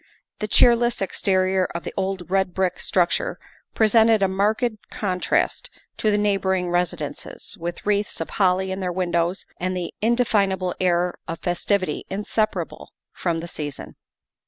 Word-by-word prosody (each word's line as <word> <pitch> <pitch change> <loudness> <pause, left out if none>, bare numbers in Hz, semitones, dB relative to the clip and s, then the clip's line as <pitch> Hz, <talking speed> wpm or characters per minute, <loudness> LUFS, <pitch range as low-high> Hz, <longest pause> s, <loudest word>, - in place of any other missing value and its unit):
The 210 - -2
cheerless 240 +2 +4
exterior 190 -1 +1
of 170 - -3
the - - -6
old 190 -2 -3
red 190 -2 +1
brick 185 -1 0
structure 185 - +1 0.4
pre 220 - +4
sented 220 -1 +5
a - - +4
marked 215 +4 0
contrast 185 -3 0 0.3
to 215 - +1
the 205 - +3
neighboring 190 -3 +1
residences, 175 0 -2
with 175 +1 -5
wreaths 205 0 0
of - - -4
holly 190 -1 +2
in 190 - -3
their 185 -2 -1
windows 175 0 0
and 185 +1 -1
the 175 -1 -4
inde 235 +2 +3
finable 190 -4 +1
air 180 -1 +1
of 165 - -4
festivity 185 +2 -1
inseparable 210 +2 -2 0.2
from 170 -2 -1
the 165 +1 -5
season. 145 -5 -6
190 Hz, 150 wpm, -23 LUFS, 180-205 Hz, 0.4 s, sented